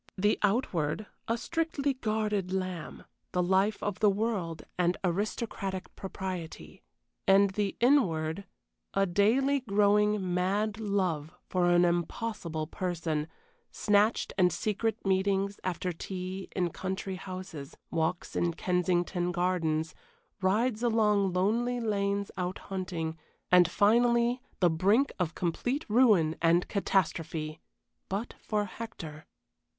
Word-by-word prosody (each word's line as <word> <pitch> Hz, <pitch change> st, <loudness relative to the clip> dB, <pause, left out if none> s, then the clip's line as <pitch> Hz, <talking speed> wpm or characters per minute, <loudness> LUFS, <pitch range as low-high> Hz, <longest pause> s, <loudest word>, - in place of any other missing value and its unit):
The 205 Hz, +3 st, +2 dB
outward, 195 Hz, -, 0 dB, 0.2 s
a 230 Hz, -, +1 dB
strictly 295 Hz, 0 st, -1 dB
guarded 215 Hz, -5 st, -1 dB
lamb, 185 Hz, -4 st, -4 dB, 0.3 s
the 180 Hz, -1 st, +2 dB
life 190 Hz, +4 st, +2 dB
of 205 Hz, -2 st, -2 dB
the 210 Hz, -, +5 dB
world 195 Hz, -6 st, -1 dB
and 180 Hz, 0 st, +1 dB
aristocratic 195 Hz, 0 st, -2 dB
propriety; 185 Hz, -3 st, -6 dB, 0.5 s
and 195 Hz, 0 st, +6 dB
the 200 Hz, 0 st, -2 dB
inward, 190 Hz, -, +2 dB, 0.5 s
a 195 Hz, 0 st, +4 dB
daily 230 Hz, +10 st, +3 dB
growing 210 Hz, -4 st, +2 dB
mad 200 Hz, +4 st, 0 dB
love 185 Hz, -8 st, -1 dB
for 180 Hz, -1 st, +1 dB
an 175 Hz, 0 st, +5 dB
impossible 170 Hz, -1 st, -2 dB
person, 165 Hz, -3 st, -2 dB, 0.4 s
snatched 210 Hz, +2 st, +2 dB
and 180 Hz, -1 st, +5 dB
secret 215 Hz, +4 st, -2 dB
meetings 195 Hz, +1 st, +1 dB
after 180 Hz, 0 st, -2 dB
tea 185 Hz, +2 st, -6 dB
in 180 Hz, -3 st, 0 dB
country 190 Hz, +1 st, -4 dB
houses, 185 Hz, -7 st, -8 dB
walks 165 Hz, +2 st, -1 dB
in 170 Hz, -1 st, 0 dB
Kensington 180 Hz, 0 st, 0 dB
Gardens, 165 Hz, -3 st, 0 dB, 0.5 s
rides 215 Hz, +5 st, +1 dB
along 210 Hz, -4 st, +3 dB
lonely 230 Hz, +7 st, +1 dB
lanes 200 Hz, -3 st, -1 dB
out 180 Hz, 0 st, -2 dB, 0.2 s
hunting, 165 Hz, -4 st, -3 dB, 0.3 s
and, 180 Hz, -2 st, +7 dB
finally, 235 Hz, +3 st, +3 dB, 0.2 s
the 175 Hz, -, +6 dB
brink 200 Hz, -, +3 dB
of 170 Hz, -3 st, -1 dB
complete 245 Hz, -, -1 dB
ruin 210 Hz, -9 st, +4 dB
and 170 Hz, +1 st, +3 dB
catastrophe 165 Hz, -5 st, -1 dB, 0.5 s
but 205 Hz, +5 st, -3 dB
for 210 Hz, -1 st, -1 dB
Hector. 165 Hz, -8 st, -8 dB
190 Hz, 115 wpm, -30 LUFS, 175-210 Hz, 0.5 s, and